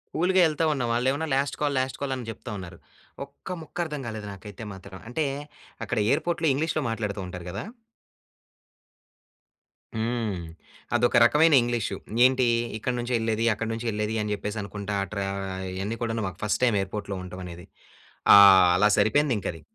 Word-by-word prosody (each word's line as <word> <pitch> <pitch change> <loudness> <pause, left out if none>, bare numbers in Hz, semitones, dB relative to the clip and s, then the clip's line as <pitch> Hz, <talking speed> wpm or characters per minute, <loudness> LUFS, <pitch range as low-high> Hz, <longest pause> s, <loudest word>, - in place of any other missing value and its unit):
కూల్‌గా 185 +3 +3
ఎళ్తా 160 +1 0
ఉన్న, 130 -3 -2
వాళ్ళు 120 +2 +1
ఏమోని 160 +3 -2
"లాస్ట్ 140 +1 -1
కాల్, 145 -1 +1
లాస్ట్ 130 0 -2
కాల్" 140 -2 -1
అని 125 - -6
చెప్తా 115 +1 -9
ఉన్నారు. 90 -2 -9 0.5
ఒక్క - - -20
ముక్క 155 - -12
అర్థం 150 -3 -5
కాలేదు 110 -2 -6
నాకైతే 100 +2 -10
మాత్రం. 95 0 -11
అంటే, 155 +5 -1 0.6
అక్కడ 105 - -3
ఎయిర్‌పోర్ట్‌లో 165 +3 +1
ఇంగ్లీష్‌లో 155 +1 -1
మాట్లాడుతూ 105 -3 -3
ఉంటారు 90 -1 -8
కదా! 100 - -5 2.3
హ్మ్. 115 -2 -1 0.6
అదొక 120 - +3
రకమైన 150 +6 +5
ఇంగ్లీషు. 120 -4 -1 0.3
ఏంటి, 130 -1 +3 0.3
ఇక్కడి 125 +3 -2
నుంచి 120 +1 -3
ఎళ్ళేది, 115 0 0
అక్కడి 110 +2 -4
నుంచి 115 +1 -4
వెళ్ళేది 105 +1 -2
అని 105 0 -3
చెప్పేసి 105 +1 -4
అనుకుంటా 100 0 -5
ఆ - - -6
ట్ర 100 - -2
ఆహ్, 95 -1 -5
ఇయన్నీ 100 +5 -3
కూడా 115 -1 -1
మాకు 90 - -8
ఫస్ట్ 105 +3 0
టైమ్ 110 -4 +2
ఎయిర్‌పోర్ట్‌‌లో 100 0 -5
ఉండటం 90 0 -8
అనేది. 85 0 -9 0.7
ఆహ్, 95 -3 +9
అలా 105 +2 +4
సరిపోయింది 120 +6 +3
ఇంక - - -5
అది. 80 - -12
110 Hz, 165 wpm, -26 LUFS, 100-130 Hz, 2.3 s, ఆహ్